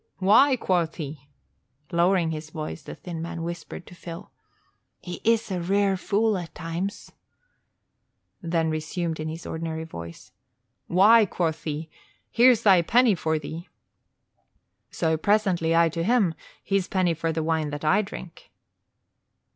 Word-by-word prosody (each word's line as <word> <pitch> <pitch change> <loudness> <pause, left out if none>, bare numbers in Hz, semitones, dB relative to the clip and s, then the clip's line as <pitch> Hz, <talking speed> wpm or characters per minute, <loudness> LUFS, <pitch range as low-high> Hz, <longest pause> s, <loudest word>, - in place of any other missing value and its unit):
'Why,' 225 +9 +5
quoth 175 -8 0
he," 145 -3 -8 0.6
lowering 170 -1 +2
his 155 0 -6
voice, 155 0 -6
the - - -9
thin 170 -3 -7
man 170 0 -5
whispered 170 0 -6
to - - -13
Phil, 170 +1 -9 0.7
"He 175 -1 -8
is 225 -1 +2
a 180 -2 -2
rare 195 +2 +2
fool 205 +2 +1
at 170 -2 -9
times," 175 +4 -5 1.3
then 165 -2 0
resumed 160 +1 -3
in 155 - -3
his 165 +2 -7
ordinary 160 0 -4
voice, 85 - -10 0.6
"'Why,' 210 +5 +6
quoth 165 -3 -2
he, 155 0 -3 0.4
'here's 240 -1 +5
thy 190 -4 +6
penny 235 +6 +4
for 160 -2 -1
thee.' 160 +4 -7 1.2
So, 160 -1 0
presently, 180 -4 +2
I 170 0 +5
to 165 +1 -4
him: 205 -4 +2 0.3
his 195 -2 0
penny 185 -3 +1
for 165 0 -2
the 160 0 -2
wine 160 -1 0
that 145 +1 -5
I 155 +7 +4
drink. 185 -3 -10
170 Hz, 140 wpm, -25 LUFS, 160-195 Hz, 1.3 s, Why